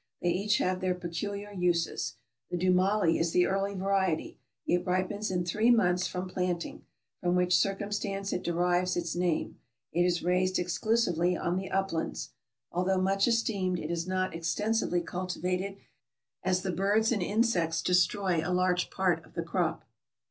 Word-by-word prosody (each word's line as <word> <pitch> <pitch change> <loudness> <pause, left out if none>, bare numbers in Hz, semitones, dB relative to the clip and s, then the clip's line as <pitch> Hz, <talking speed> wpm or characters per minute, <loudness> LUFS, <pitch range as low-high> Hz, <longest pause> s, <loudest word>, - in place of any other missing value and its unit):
They 175 - +1
each 205 +4 +1
have 185 0 0
their 185 -1 +1
peculiar 200 +4 -5
uses. 175 -3 0 0.3
The 175 - -2
dumali 185 0 +3
is 165 0 0
the 180 - +4
early 195 +1 -1
variety; 190 -3 0 0.3
it 175 0 +1
ripens 185 +4 -1
in 180 -2 -1
three 215 +7 +2
months 180 -6 +3
from 180 0 -4
planting, 180 -2 -3 0.4
from 180 0 +1
which 180 0 +3
circumstance 195 0 -1
it 180 - -1
derives 175 +1 +1
its 170 -1 -2
name; 175 -2 -1 0.3
it 175 - +1
is 175 -1 +1
raised 185 +1 +2
ex 175 -1 -2
clusively 180 -6 +2
on 175 - 0
the 190 +1 -3
uplands. 195 -4 -2 0.4
Although 185 +2 +1
much 195 +2 +2
esteemed, 205 -6 +1
it 160 0 -4
is 170 0 -2
not 185 -1 -1
extensively 180 +3 0
cultivated, 180 +2 -3 0.7
as 185 0 +1
the 190 - -1
birds 205 +5 +2
and 215 -5 +1
insects 180 -5 +1
destroy 180 -1 +2
a 170 - -3
large 180 0 +1
part 185 -3 0
of - - -20
the - - -1
crop. - - -1
185 Hz, 160 wpm, -29 LUFS, 175-195 Hz, 0.7 s, the